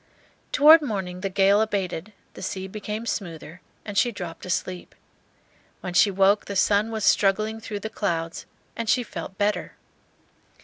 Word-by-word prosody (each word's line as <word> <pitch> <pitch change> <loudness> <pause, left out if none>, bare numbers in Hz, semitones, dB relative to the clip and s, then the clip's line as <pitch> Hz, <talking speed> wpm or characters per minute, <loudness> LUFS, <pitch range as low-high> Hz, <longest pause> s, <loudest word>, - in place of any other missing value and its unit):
Toward 310 +3 +8
morning 190 -9 -4
the 195 - -2
gale 195 +2 +4
abated, 200 -3 -2 0.2
the - - -11
sea 190 0 -4
became 210 +3 -5
smoother, 170 -6 -5 0.2
and 205 - -6
she 240 +4 +3
dropped 175 -5 -7
asleep. 180 0 -3 0.9
When 180 - -5
she 200 - +5
woke 195 +1 +3
the 200 - -6
sun 205 +3 +3
was 220 -2 -2
struggling 215 +3 +2
through 215 -2 -6
the 220 - -4
clouds, 165 -4 -3 0.3
and 230 -1 -3
she 250 - +3
felt 195 -3 -8
better. 205 +1 -1
200 Hz, 150 wpm, -25 LUFS, 185-215 Hz, 0.9 s, Toward